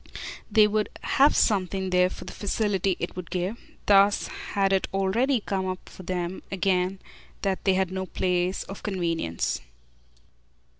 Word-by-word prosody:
They 215 Hz, -1 st, +7 dB
would 210 Hz, 0 st, 0 dB
"have 280 Hz, +2 st, +4 dB
something" 190 Hz, -2 st, +1 dB
there 180 Hz, 0 st, +4 dB
for -, -, -9 dB
the -, -, -8 dB
facility 200 Hz, -2 st, 0 dB
it -, -, -4 dB
would 180 Hz, -2 st, -6 dB
give. 185 Hz, +5 st, -2 dB, 0.3 s
Thus 200 Hz, 0 st, +5 dB, 0.3 s
had 195 Hz, -1 st, +2 dB
it 190 Hz, -, +2 dB
already 220 Hz, +7 st, +1 dB
come 190 Hz, -2 st, -2 dB
up 185 Hz, 0 st, -5 dB
for -, -, -11 dB
them 180 Hz, 0 st, -3 dB
again 185 Hz, 0 st, +1 dB, 0.5 s
that 195 Hz, -2 st, -1 dB
they 190 Hz, -2 st, +4 dB
had 190 Hz, -1 st, +1 dB
no 190 Hz, 0 st, -3 dB
place 180 Hz, 0 st, 0 dB
of 195 Hz, -, -9 dB
convenience. 165 Hz, -, -1 dB
190 Hz, 150 wpm, -26 LUFS, 185-200 Hz, 0.5 s, They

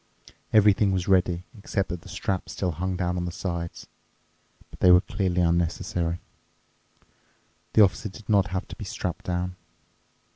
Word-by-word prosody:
Everything 105 Hz, -1 st, +5 dB
was 95 Hz, -2 st, -1 dB
ready, 90 Hz, -2 st, +2 dB
except 100 Hz, -2 st, -2 dB
that 90 Hz, -1 st, -4 dB
the -, -, -13 dB
straps 95 Hz, -2 st, -3 dB
still 90 Hz, -2 st, -1 dB
hung 90 Hz, +3 st, -2 dB
down 90 Hz, 0 st, -1 dB
on 90 Hz, -, -2 dB
the 90 Hz, -, -3 dB
sides. 85 Hz, -1 st, -4 dB, 0.9 s
But -, -, -13 dB
they 90 Hz, -, +5 dB
were 90 Hz, 0 st, +8 dB
clearly 90 Hz, -1 st, -1 dB
unnecessary. 85 Hz, 0 st, 0 dB, 1.5 s
The 110 Hz, -, +8 dB
Officer 100 Hz, +2 st, +1 dB
did 100 Hz, +2 st, -13 dB
not 100 Hz, -3 st, +4 dB
have 95 Hz, +1 st, -3 dB
to -, -, -7 dB
be -, -, -8 dB
strapped 90 Hz, -2 st, -4 dB
down. 90 Hz, 0 st, -2 dB
90 Hz, 155 wpm, -26 LUFS, 90-95 Hz, 1.5 s, were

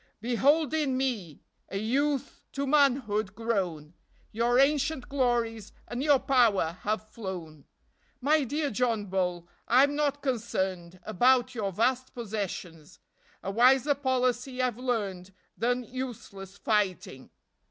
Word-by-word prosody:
Behold 275 Hz, +7 st, +2 dB
in 290 Hz, -5 st, 0 dB
me 220 Hz, -, -3 dB, 0.3 s
A 195 Hz, -, -3 dB
youth 275 Hz, +6 st, -1 dB
to 280 Hz, 0 st, -2 dB
manhood 255 Hz, -8 st, +2 dB
grown; 180 Hz, -9 st, -2 dB, 0.4 s
Your 235 Hz, +2 st, +1 dB
ancient 280 Hz, 0 st, +2 dB
glories 235 Hz, -6 st, -1 dB
And 240 Hz, +1 st, -4 dB
your 290 Hz, -1 st, +5 dB
power 215 Hz, -11 st, +2 dB
have 215 Hz, +1 st, -2 dB
flown. 175 Hz, -9 st, -7 dB, 0.5 s
My 295 Hz, +3 st, +3 dB
dear 290 Hz, +3 st, -2 dB
John 225 Hz, -2 st, 0 dB
Bull, 180 Hz, -3 st, -2 dB, 0.2 s
I'm 275 Hz, +4 st, +4 dB
not 290 Hz, -1 st, 0 dB
concerned 190 Hz, -8 st, -2 dB
About 255 Hz, +4 st, +3 dB
your 210 Hz, -5 st, -2 dB
vast^possessions; 210 Hz, -8 st, -3 dB, 0.5 s
A 195 Hz, -, -3 dB
wiser 255 Hz, +6 st, +4 dB
policy 255 Hz, -2 st, -1 dB
I've 250 Hz, -2 st, 0 dB
learned 200 Hz, -7 st, -3 dB, 0.2 s
Than 245 Hz, +2 st, 0 dB
useless 210 Hz, -6 st, -7 dB
fighting. 190 Hz, -12 st, -1 dB
240 Hz, 115 wpm, -28 LUFS, 195-265 Hz, 0.5 s, your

